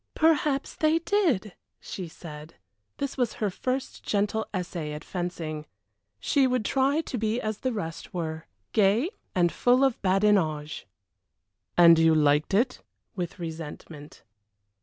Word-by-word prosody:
"Perhaps 300 -3 +2
they 310 +1 +3
did!" 330 - +1 0.3
she 185 -3 -6
said. 155 -1 -10 0.4
This 280 0 -3
was 245 -4 0
her 210 -4 -1
first 255 +7 -3
gentle 210 +2 0
essay 175 -5 -4
at 150 +2 -7
fencing. 165 -4 -4 0.5
She 275 -3 +3
would 250 -4 0
try 275 +6 +2
to 260 - -5
be 220 +2 0
as 215 -2 -3
the 260 - -1
rest 165 -7 -5
were, 160 -2 -4 0.3
gay 215 - +3 0.2
and 175 -2 +3
full 250 +2 +3
of 265 -3 +1
badinage. 185 -6 +1 0.9
"And 170 -2 +8
you 165 -1 +5
liked 150 +3 +3
it?" 250 +5 +1 0.3
with 175 -3 -4
resentment. 160 -2 -8
195 Hz, 135 wpm, -27 LUFS, 165-255 Hz, 0.9 s, And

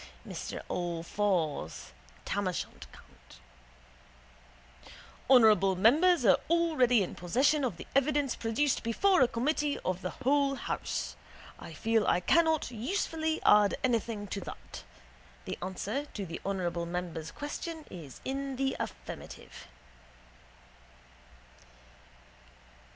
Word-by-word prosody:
Mr - - -6
Allfours 170 - -2 0.3
(Tamoshant. 190 -3 -3
Con.): - - -15 2.3
Honourable 215 -7 +6
members 285 - +4
are 195 - +6
already 305 -10 +3
in 180 - -5
possession 265 - +2
of 230 -10 -1
the - - -9
evidence 275 0 +2
produced 235 +5 0
before 360 - +3
a 255 - +6
committee 290 +5 0
of 185 0 -1
the 180 - -3
whole 275 +3 +1
house. - - -3 0.4
I - - -9
feel 225 -1 +1
I - - +3
cannot 320 - +2
usefully 315 - -2
add 210 -1 +5
anything 230 -4 0
to 200 - -4
that. - - -9 0.6
The - - -5
answer 200 +10 -3
to 200 -7 -6
the 165 -1 -7
honourable 175 -3 -2
member's 170 -2 -4
question 310 - -6
is 155 -7 -10
in 275 0 -3
the 270 +1 0
affirmative. - - -8
230 Hz, 105 wpm, -30 LUFS, 185-285 Hz, 2.3 s, Honourable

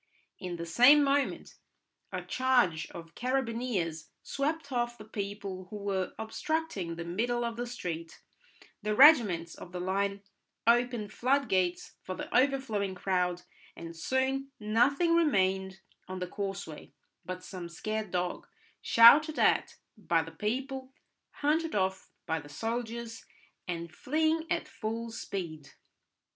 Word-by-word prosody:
In 180 -1 -5
the 170 0 -5
same 250 - +7
moment 280 0 0 0.5
a - - -4
charge 245 -11 +2
of 165 -1 -10
carabineers 230 - -2
swept 285 +1 -2
off 240 -1 -1
the 215 - -11
people 200 -3 -5
who - - -8
were 200 -2 -2
obstructing 220 - -3
the 170 0 -6
middle 240 +7 -1
of 235 -1 -3
the 240 +1 -4
street, 170 -9 -6 0.6
the 210 0 -1
regiments 210 - +6
of 175 - -11
the 180 - -4
line 200 +2 -1 0.4
opened 235 -2 +2
floodgates 220 -9 0
for 185 - -5
the - - -6
overflowing 245 -7 +1
crowd, 180 -1 0 0.3
and 165 0 -8
soon 265 +8 -1
nothing 255 +10 +3
remained 190 - +2 0.3
on 185 - -5
the 180 - -3
causeway 195 -4 -6 0.3
but 185 0 -6
some 180 -2 -7
scared 215 +4 -3
dog, 180 0 -2 0.3
shouted 295 +7 +7
at - - +3 0.2
by 170 -7 +1
the 165 - -10
people, 260 +8 -3 0.4
hunted 315 +1 0
off 190 -1 -1 0.2
by 160 -1 -1
the 145 -1 -12
soldiers, 230 +5 -4 0.4
and 170 -1 -4
fleeing 315 - 0
at - - -1
full 230 +1 -4
speed. 165 -9 -6
215 Hz, 130 wpm, -30 LUFS, 180-255 Hz, 0.6 s, same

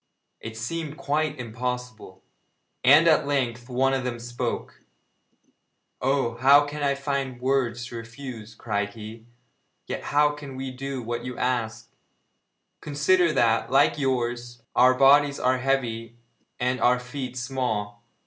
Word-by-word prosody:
It 115 0 -8
seemed 155 +6 -4
quite 150 0 -1
impossible, 125 0 -5 0.6
and 145 +6 +7
at 155 -3 +4
length 125 -3 -1
one 135 +2 +2
of 135 -1 0
them 120 -2 -3
spoke: 120 +1 -4 1.2
'Oh, 130 -3 0
how 140 +3 +6
can 145 +1 -6
I 140 -1 +2
find 135 -2 -3
words 125 -2 0
to 120 0 -7
refuse?' 115 -2 -9
cried 105 0 -3
he, 110 +1 -10 0.6
'yet - - -5
how 145 0 +3
can 145 -2 -9
we 130 0 -5
do 135 0 -5
what 120 +1 -4
you 125 -1 -6
ask? 115 -3 -2 0.9
Consider 160 +4 +2
that, 115 -4 +2
like 135 +3 +3
yours, 120 -3 -2
our 130 +1 +6
bodies 140 +2 +5
are 130 0 +2
heavy 120 -4 -1 0.4
and 125 +1 0
our 125 0 +4
feet 125 0 -6
small. 120 -5 -3
125 Hz, 135 wpm, -25 LUFS, 120-140 Hz, 1.2 s, and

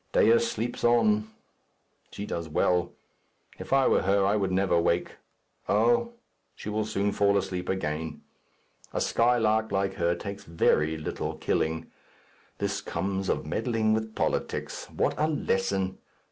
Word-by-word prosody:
Dea 115 +1 +5
sleeps 115 +1 -3
on. 110 -3 +3 0.8
She 100 - -6
does 85 -5 -4
well. 90 +2 +1 0.7
If - - -8
I 135 -1 +4
were - - +3
she 95 - -5
I 100 +1 +3
would 95 -3 0
never 95 0 +1
awake. 85 0 +1 0.5
Oh! 120 - +3 0.4
she - - -7
will 105 0 -1
soon 105 -1 0
fall 100 0 +3
asleep 90 -2 -3
again. 80 -4 -3 0.7
A - - -1
skylark 110 -2 +2
like 95 0 0
her 85 -1 +1
takes 100 +1 -7
very 80 -2 +1
little 80 - -4
killing. 80 +1 -1 0.7
This 100 0 -2
comes 95 -1 -2
of - - 0
meddling 110 -3 0
with 110 0 -2
politics. - - -2
What - - 0
a 155 - +3
lesson! 95 -9 -1
100 Hz, 140 wpm, -27 LUFS, 90-110 Hz, 0.8 s, Dea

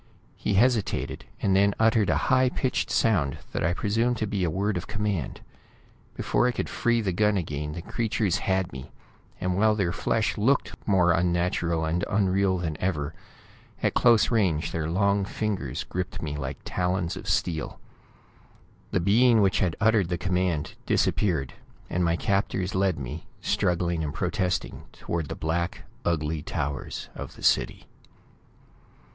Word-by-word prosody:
He 105 - -1
hesitated, 115 0 +1 0.2
and 95 -1 +3
then 100 +1 +4
uttered 110 -2 +3
a - - +3
high 130 0 +5
pitched 130 0 -1
sound 80 -12 +2
that - - -2
I 85 +2 +1
presumed 115 +4 +1
to 110 - -1
be 100 -2 -1
a 85 - +1
word 100 +5 -1
of 90 - -4
command. 105 -6 -2 0.7
Before 120 - +1
I - - +2
could - - -3
free 120 -1 +1
the 100 -3 0
gun 105 +2 +2
again, 75 -3 -3
the 85 +1 -6
creatures 105 -4 0
had 95 -4 0
me, 65 0 -8 0.5
and 90 0 -1
while 110 +2 +3
their 95 -5 0
flesh 110 +3 0
looked 130 +6 +2
more 90 -4 +4
unnatural 85 -1 +1
and 85 +2 -1
unreal 95 -2 +2
than 80 -4 -3
ever, 80 -5 -1 0.7
at - - +2
close 120 -2 +4
range, 95 -9 +1
their 80 -1 -2
long 100 +3 +2
fingers 95 - -3
gripped 90 0 -4
me 75 -2 -4
like 70 -2 -4
talons 90 -1 -1
of - - -6
steel. 80 -3 -1 1.1
The - - +1
being 115 +6 +4
which 95 -2 +3
had 90 -4 +1
uttered 110 -5 +3
the 90 - -1
command 90 -4 -1
disappeared, 75 -11 +1 0.4
and 90 - +1
my 85 -1 +2
captors 95 0 0
led 95 -2 +1
me, 70 +4 -6
struggling 85 -2 0
and 75 - -4
protesting, 90 -1 -2
toward 85 -3 -4
the - - -4
black, 85 +2 -2 0.2
ugly 80 -2 -1
towers 70 0 -4
of - - -8
the - - -13
city. - - +2
90 Hz, 155 wpm, -26 LUFS, 85-105 Hz, 1.1 s, high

